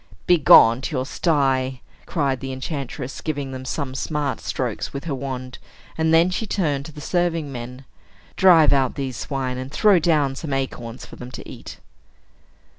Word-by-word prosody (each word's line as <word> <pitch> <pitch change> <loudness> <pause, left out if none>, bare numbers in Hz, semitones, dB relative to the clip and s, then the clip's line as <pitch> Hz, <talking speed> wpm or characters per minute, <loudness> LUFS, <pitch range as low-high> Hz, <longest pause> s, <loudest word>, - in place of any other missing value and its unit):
"Begone 130 -8 +7
to 145 - -4
your 130 0 -1
sty!" 135 -4 0 0.3
cried 140 -6 0
the 135 -1 -5
enchantress, 135 0 -5
giving 145 -4 -3
them 130 0 -7
some 130 -1 -3
smart 145 0 -2
strokes - - -3
with 140 - -6
her 165 -4 -3
wand; 130 -2 -5 0.4
and 160 0 +1
then 165 +3 +5
she 220 +4 -3
turned 145 -9 -1
to - - -10
the 150 - -11
serving 165 -2 -1
men 125 +1 -8 0.5
"Drive 165 -6 +6
out 135 -2 +1
these 135 -3 -4
swine, 130 -3 -3
and 130 +1 -6
throw 195 +4 +4
down 150 -5 +2
some 145 +1 -5
acorns 125 -3 -4
for - - -13
them 125 - -8
to - - -9
eat." - - -10
140 Hz, 170 wpm, -22 LUFS, 130-160 Hz, 0.5 s, Begone